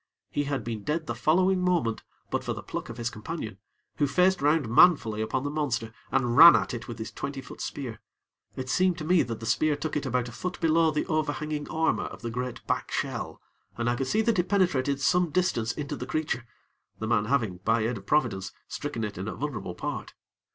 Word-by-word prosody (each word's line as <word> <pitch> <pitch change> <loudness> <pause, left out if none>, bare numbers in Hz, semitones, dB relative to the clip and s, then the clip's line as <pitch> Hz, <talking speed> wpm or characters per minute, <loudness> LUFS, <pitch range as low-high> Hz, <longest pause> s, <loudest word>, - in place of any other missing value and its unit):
He 145 - 0
had 140 -1 -2
been 110 -3 -4
dead 155 +5 -1
the - - -2
following 185 +4 +3
moment, 170 -12 +1 0.3
but - - -1
for - - -2
the - - -7
pluck - - -5
of 115 - -7
his 120 0 -2
companion, 110 - -6 0.4
who 145 - +2
faced 180 +5 +3
round 145 -2 +3
manfully 115 -4 +5
upon 130 +4 -1
the 145 - -2
monster, 130 -7 -2 0.2
and 120 -3 +1
ran 165 +4 +11
at - - 0
it 120 - -5
with 120 - -6
his 110 0 -6
twenty 140 -1 -5
foot 130 - -10
spear. 120 -6 -5 0.5
It 130 - -5
seemed 180 +5 +2
to 155 - -5
me 175 0 +4
that 115 -2 -3
the 115 - -7
spear 150 +7 +2
took 150 +2 -4
it 150 -2 -1
about 125 -1 0
a - - -8
foot 180 +9 -5
below 165 0 +4
the 150 -1 -1
overhanging 155 -1 -2
armor 160 0 +1
of - - -9
the 115 - -3
great 125 +1 -4
back - - -1
shell, - - -3 0.4
and 120 0 -1
I 120 - +2
could 130 +1 -2
see 215 +9 +2
that 225 -4 +2
it 175 - 0
penetrated 145 -9 +2
some 175 +4 +3
distance 145 -10 +1
into 140 +3 -4
the 125 - -6
creature, 150 -6 -2 0.5
the 110 - -4
man 110 -2 +2
having, 110 -7 0
by 110 +5 +1
the 110 - +1
aid 120 - -4
of 100 - -18
Providence, 105 -10 +1 0.2
stricken 145 -6 -4
it 105 -3 -4
in 95 - -4
a - - -4
vulnerable 135 -10 -4
part. - - -5
140 Hz, 225 wpm, -27 LUFS, 115-155 Hz, 0.5 s, ran